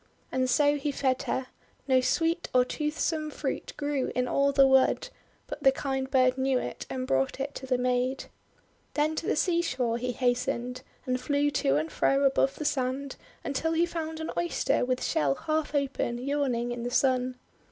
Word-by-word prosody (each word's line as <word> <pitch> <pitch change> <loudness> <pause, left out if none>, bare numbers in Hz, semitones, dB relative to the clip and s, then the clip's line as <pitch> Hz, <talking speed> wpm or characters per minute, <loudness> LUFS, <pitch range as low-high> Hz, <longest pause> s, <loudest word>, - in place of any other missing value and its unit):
And 255 0 0
so 290 +2 +3
he 290 +1 -2
fed 260 -2 0
her. 260 - 0 0.4
No 260 -1 +4
sweet 330 +6 0
or 250 0 +6
toothsome 305 +2 -2
fruit - - -4
grew 290 -3 -1
in 250 0 +1
all 280 +2 +2
the 275 -1 +6
wood, 265 - +3 0.4
but 295 - -7
the 270 - +6
kind 265 -1 -2
bird 255 -1 +3
knew 265 0 +2
it 125 - -5
and 130 -1 -3
brought 135 - 0
it 280 +1 -3
to 265 - -7
the 255 -1 +2
maid. 250 +1 0 0.7
Then 305 +1 +1
to 330 - -3
the - - +2
seashore 305 -10 0
he 250 +1 -2
hastened, 250 0 -1 0.2
and 255 0 -1
flew 290 0 +1
to 135 - +1
and 155 +2 -1
fro 275 +1 +2
above 270 0 +3
the 305 - -5
sand, 265 0 -1 0.3
until 320 +4 -1
he 330 +1 +3
found 320 -2 -5
an 320 - -4
Oyster 345 0 +1
with 255 0 -1
shell 140 -2 +1
half 310 - -2
open, 275 -4 -1
yawning 255 -2 -1
in 240 0 -4
the 240 - -2
Sun. 255 0 +1
265 Hz, 185 wpm, -28 LUFS, 250-290 Hz, 0.7 s, or